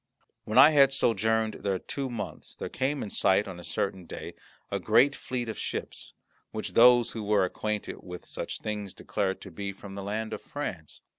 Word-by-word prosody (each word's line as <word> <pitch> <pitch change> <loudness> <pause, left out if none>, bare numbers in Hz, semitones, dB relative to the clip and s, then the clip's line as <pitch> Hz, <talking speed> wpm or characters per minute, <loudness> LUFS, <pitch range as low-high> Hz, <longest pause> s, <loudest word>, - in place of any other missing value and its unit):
When 110 - -1
I 155 - +10
had 140 -3 +6
sojourned 110 -4 +2
there 100 -2 0
two 135 +8 -4
months 115 -3 -6
there - - -5
came 135 +3 -1
in 100 - -6
sight 100 +2 +3
on 90 -2 -7
a - - -10
certain 95 0 -2
day - - -7 0.4
a - - 0
great 140 +1 +4
fleet 125 -2 -4
of 110 - -5
ships, - - -5 0.4
which 110 - -5
those 120 0 +7
who 110 - -5
were 105 -2 +3
acquainted 105 +3 -3
with 90 -1 -9
such - - -5
things 105 -3 -4
declared 95 -2 -2
to 95 - -9
be 100 +4 -4
from 100 0 -11
the 100 - -5
land 110 +2 -3
of - - -5
France. 95 - -6
105 Hz, 195 wpm, -28 LUFS, 100-120 Hz, 0.4 s, I